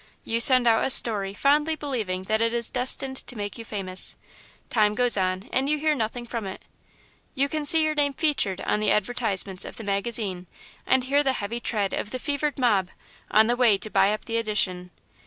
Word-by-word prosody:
You 230 0 -2
send 255 +1 +7
out 225 -1 +3
a - - 0
story, 210 -6 +3
fondly 295 +6 +2
believing 225 -11 -4
that 220 +3 -1
it 230 0 +1
is 235 -1 -1
destined 265 +1 0
to 250 - -3
make 205 +1 -6
you - - -6
famous. 190 -4 -5 0.5
Time 210 -2 +2
goes 245 0 +3
on, 185 +2 -2
and 270 +2 0
you 300 - +1
hear 305 +1 +1
nothing 240 -2 -4
from 230 -3 -5
it. 190 - -8 0.7
You 275 0 +1
can 300 0 -3
see 320 +1 +4
your 310 0 0
name 290 -2 +1
'featured' 260 - 0
on - - -1
the 215 -1 0
advertisements 205 -4 -1
of - - -9
the 225 - -7
magazine, 200 -2 -1 0.4
and 260 -1 +3
hear 280 +3 +2
the 270 -2 0
heavy 230 +1 -4
tread 205 -5 -1
of - - -3
the 255 - -4
fevered 290 +2 -2
mob, 210 -8 +1 0.4
on 215 +1 +5
the 240 +2 +1
way 240 -5 +3
to 210 +2 -1
buy 195 - +3
up 215 - -4
the 230 -1 -2
edition. 195 -5 -1
230 Hz, 210 wpm, -25 LUFS, 205-265 Hz, 0.7 s, send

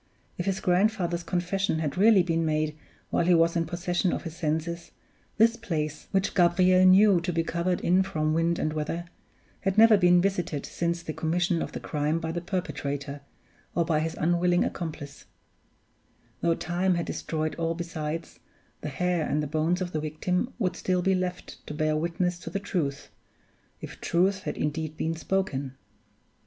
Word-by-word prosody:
If 175 - -4
his 190 -1 0
grandfather's 180 -2 +1
confession 180 +1 -1
had 150 -3 -2
really 200 -1 +6
been 165 -1 0
made 155 -1 0 0.4
while - - +2
he 180 - +6
was 165 +1 +3
in 165 -1 0
possession 175 +1 0
of - - -3
his 165 -2 -7
senses, 165 +2 -2 0.5
this 230 +1 +5
place 155 -9 -4
(which 195 -1 0
Gabriel 185 +1 +4
knew 190 -1 +6
to 180 +1 -2
be 165 -1 0
covered 170 +2 -1
in 180 +2 +3
from 155 -5 -1
wind 165 +1 +1
and 155 - -1
weather) 155 +3 -3 0.5
had 195 0 -1
never 225 -1 +8
been 180 -2 +5
visited 175 -6 -1
since 170 0 -2
the 155 - -4
commission 175 +2 0
of - - -4
the - - -4
crime 150 +1 -1
by 160 -1 -3
the 175 +1 -3
perpetrator, 145 -6 -4 0.5
or 170 - +2
by 160 -2 +1
his 160 +1 -2
unwilling 175 +2 +2
accomplice; 150 -4 -6 1.1
though 170 -1 +2
time 180 +3 0
had 170 - -1
destroyed 155 -1 -3
all 165 0 0
besides, 165 -1 -5 0.4
the 150 - -4
hair 175 +3 -1
and 150 +1 0
the - - -1
bones 160 +5 0
of 180 -1 -2
the 155 - -1
victim 180 - -1
would 185 -6 -1
still 180 0 0
be 190 - +3
left 180 -1 -4
to 150 - -5
bear 155 0 +1
witness 170 +2 -1
to - - -7
the 200 - -2
truth 150 -8 -3 0.7
if - - -9
truth 190 +3 +1
had - - -3
indeed 155 +1 -3
been 165 +1 -1
spoken. 145 -7 -2
170 Hz, 175 wpm, -27 LUFS, 155-180 Hz, 1.1 s, never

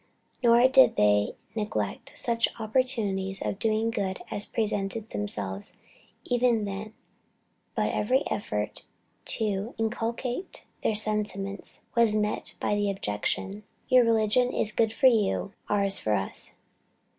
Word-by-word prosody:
Nor 240 +1 +6
did 265 0 +6
they 105 0 +3 0.2
neglect 215 -1 -3
such 235 -1 +2
opportunities 215 -5 0
of 195 - -3
doing 225 +1 +1
good 190 -4 -2
as 205 - -1
presented 215 0 -2
themselves 100 -1 -4 0.5
even 245 -3 +2
then; 205 +2 -6 0.8
but - - 0
every 255 +6 +2
effort 105 - -3 0.4
to 210 +1 -1
inculcate 235 - -3 0.2
their 220 - +1
sentiments 205 -2 -2
was 230 -2 +4
met 210 0 -1
with - - -1
the 205 -1 +1
objection, 195 - -2 0.3
"Your 255 -1 +7
religion 230 +2 +3
is 215 - +1
good 220 0 +2
for 225 - 0
you, 210 -4 +3 0.2
ours 200 -1 +2
for 110 - 0
us." 95 -1 0
215 Hz, 120 wpm, -27 LUFS, 195-230 Hz, 0.8 s, Your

